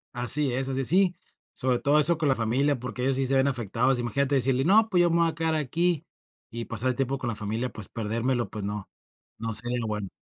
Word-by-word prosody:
Así 125 +2 +1
es, 130 +1 -2
así 135 0 -2
es. - - -3
Sí. 185 0 +3 0.4
Sobre 130 -2 0
todo 145 +2 +3
eso 165 +2 +6
con 155 -4 0
la 130 - +3
familia, 130 +4 +1
porque 125 0 -5
ellos 135 0 +1
sí 135 - 0
se 135 +1 0
ven 135 +1 +3
afectados, 120 +1 0
imagínate 140 +4 0
decirle: 130 0 +2
“No, 215 +4 +5
pues, 180 -3 +3
yo 175 - +3
me 170 - +2
voy 165 -1 +3
a 160 - -6
quedar 160 -1 0
aquí" 165 +3 0 0.4
y 115 0 -6
pasar 115 +3 -2
el 125 - -1
tiempo 135 +1 -1
con 130 - -5
la 110 - -3
familia, 110 +4 -2
pues, 110 -3 -7
perdérmelo, 115 +3 -1
pues 105 -3 -6
no, 105 -1 -5 0.5
no 115 0 -4
sería 120 +3 -3
lo 115 - -3
bueno. 105 -2 -3
130 Hz, 245 wpm, -26 LUFS, 115-145 Hz, 0.5 s, eso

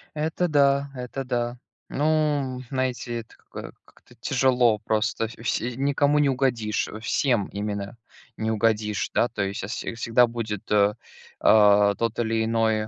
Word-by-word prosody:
Это 160 +4 -1
да. 140 -2 +2
Это 125 +2 -5
да. 120 -1 -2 0.3
Ну, 145 -4 0
знаете, 130 -3 -2
это 110 - -13
какой - - -10
как-то - - -22
тяжело 125 -4 +2
просто. 110 +1 -1
Вс 115 - -12
все 120 +2 -1
никому 140 +2 +2
не 145 -2 +3
угодишь, 125 -5 0
э, 110 - -8
всем 115 -2 +1
именно 100 +1 -5 0.4
не 110 0 -1
угодишь, 110 -1 0
да, 120 - +3
то 105 - -4
есть, 100 0 -4
а, - - -4
вс 120 - -4 0.3
всегда 120 +1 +4
будет, 110 -3 -5
э, 105 0 +3 0.5
э, 105 -1 +6
тот 115 -1 -2
или 115 -1 0
иной 110 -1 +1
115 Hz, 155 wpm, -25 LUFS, 110-135 Hz, 0.5 s, э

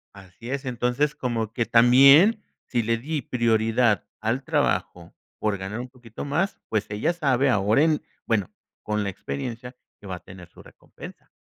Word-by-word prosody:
Así 95 +4 -12
es, 140 0 -3
entonces, 125 +4 -1
como 115 -3 -3
que 120 -1 -1
también, 135 - +6 0.2
si 120 - 0
le 115 +1 0
di 150 +5 -3
prioridad 115 -3 +1 0.2
al 120 +5 -1
trabajo, 95 - -1 0.3
por 105 -2 -1
ganar 95 +4 -6
un 125 +1 -6
poquito 120 -2 -10
más, 165 +8 -1
pues 110 -1 -1
ella 105 +11 -1
sabe 140 -5 +1
ahora 110 +4 +3
en 155 -2 +2 0.2
bueno, 105 -5 0 0.3
con 105 0 -1
la 100 - -2
experiencia, 115 - -6 0.2
que 105 - -12
va 95 - -4
a - - -9
tener 90 0 -13
su - - -16
recompensa. - - -14
120 Hz, 170 wpm, -24 LUFS, 105-135 Hz, 0.3 s, también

